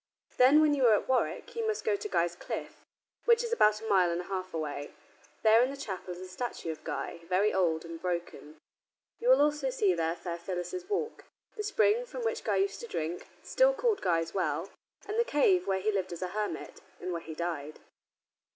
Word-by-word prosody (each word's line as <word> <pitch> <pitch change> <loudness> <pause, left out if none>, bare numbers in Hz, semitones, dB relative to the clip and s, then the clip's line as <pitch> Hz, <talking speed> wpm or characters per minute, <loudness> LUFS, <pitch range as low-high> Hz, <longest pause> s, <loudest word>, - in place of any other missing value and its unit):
Then, 270 +5 +7
when 305 -1 +4
you 270 -4 +4
are 220 - +7
at - - -2
Warwick, 260 - 0
you 455 -1 -1
must 435 -1 -1
go 445 -2 +2
to 420 +1 -5
Guy's 170 - +1
Cliff, - - -6 0.4
which 470 0 +5
is 470 0 -2
about 210 - +4
a 220 - -7
mile 190 -4 +4
and 170 0 -1
a - - -3
half 185 0 -4
away. 145 -2 -4 0.5
There, 220 +1 +7
in 255 - +1
the 280 - -6
chapel, 190 -8 -5
is - - -10
a 185 - -7
statue 185 -3 -4
of 155 - -9
Guy, - - -4
very 190 +4 +2
old 170 -4 +1
and 165 0 -8
broken. 170 -3 -4 0.6
You 480 - 0
will - - +7
also 295 -2 +1
see 210 -7 +2
there 165 -1 0
Fair 170 0 -5
Phyllis's 190 - -5
Walk, 445 +2 -2 0.3
the 430 - -3
spring 425 +3 +2
from - - -6
which 460 - -1
Guy - - +1
used 400 +1 0
to 470 - -7
drink, 165 - -4 0.2
still - - +3
called 475 -4 +1
Guy's 165 -2 0
Well, 190 - -1 0.4
and 430 +2 -1
the - - +5
cave 420 -6 +3
where 190 -1 +1
he 215 +3 +1
lived 190 -3 -2
as 175 +1 -5
a 180 - -2
hermit, 210 +2 -4 0.2
and 180 - -4
where 170 -1 -3
he 160 -1 -8
died. 155 -3 -4
205 Hz, 215 wpm, -30 LUFS, -, 0.6 s, Then